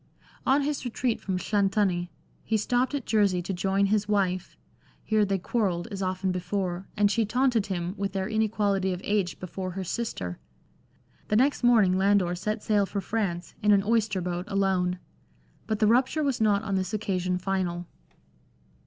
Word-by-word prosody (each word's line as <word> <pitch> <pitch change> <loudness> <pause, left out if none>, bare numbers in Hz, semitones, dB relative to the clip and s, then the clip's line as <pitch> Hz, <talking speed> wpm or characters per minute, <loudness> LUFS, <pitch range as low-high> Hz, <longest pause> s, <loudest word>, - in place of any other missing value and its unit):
On 275 +2 +4
his 290 0 -2
retreat 245 -1 -1
from 190 -2 -2
Llanthony 195 -3 +1 0.3
he 220 - +1
stopped 245 +6 0
at 275 - -3
Jersey 200 -4 +2
to 190 - -3
join 195 +2 +1
his 205 +1 +1
wife; 190 -3 0 0.5
here 215 -1 +2
they 195 0 0
quarrelled, 190 -2 -1
as 195 -1 -5
often 185 0 -1
before, 180 0 -3
and 205 -1 +4
she 230 +1 +2
taunted 240 0 +1
him 180 -2 -2
with 200 -1 -2
their 190 -1 -1
inequality 205 -3 +1
of 180 - -6
age 200 -4 0
before 185 +1 -5
her 190 +1 -4
sister. 165 - -4 0.9
The 210 - +1
next 270 +6 +3
morning 210 -7 +5
Landor 195 -2 +3
set 210 +4 -3
sail 205 -2 +2
for 200 - -3
France, 195 -4 -2
in 210 - +4
an 200 -1 +5
oyster 215 -3 +1
boat, 175 0 -3
alone. 190 -3 +1 0.7
But 215 - 0
the 215 - +3
rupture 260 +7 +3
was 270 -5 0
not 210 -1 +3
on 200 -2 -3
this 190 +1 -1
occasion 185 -3 -1
final. 180 -2 -2
200 Hz, 170 wpm, -27 LUFS, 185-215 Hz, 0.9 s, morning